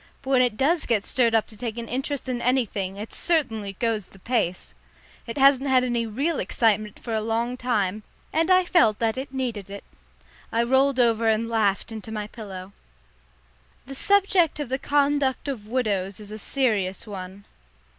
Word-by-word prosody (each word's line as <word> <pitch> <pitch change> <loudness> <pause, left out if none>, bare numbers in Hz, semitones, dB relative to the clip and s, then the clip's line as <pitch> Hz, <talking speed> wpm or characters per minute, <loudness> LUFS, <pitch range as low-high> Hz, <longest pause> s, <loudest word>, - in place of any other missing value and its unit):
But 265 - -7
when 260 -2 +5
it 240 -4 +1
does 315 +5 +1
get 215 -4 +1
stirred 235 -3 +2
up 220 - +3
to 220 - -13
take 230 0 -5
an 235 -1 -5
interest 270 +3 -3
in 245 -2 -2
anything, 215 -7 0
it 210 +2 -7
certainly 225 - 0
goes 220 -1 -1
the - - -18
pace. 195 -4 -2 0.5
It 230 - -5
hasn't 275 0 +5
had 255 -1 +4
any 240 -2 0
real 280 +9 -1
excitement 215 -2 +1
for 230 - -6
a 220 - 0
long 230 +3 -1
time, 215 -5 -1 0.3
and 325 +2 +2
I 370 0 +5
felt 230 - +4
that 225 -1 0
it 265 +1 -5
needed 240 -7 -3
it. 200 0 -8 0.7
I 230 +1 +2
rolled 265 +2 +3
over 230 -2 +3
and 220 +1 +2
laughed 220 -2 0
into 220 0 -7
my 210 -1 -3
pillow. 200 -3 -9 1.1
The 275 - -8
subject 380 0 +2
of 290 -4 -4
the 265 +1 -1
conduct 285 -1 +1
of 235 -7 -4
widows 205 -6 -1
is 210 -1 -9
a 215 - -6
serious 210 -7 0
one. 195 -1 -8
230 Hz, 180 wpm, -25 LUFS, 210-265 Hz, 1.1 s, when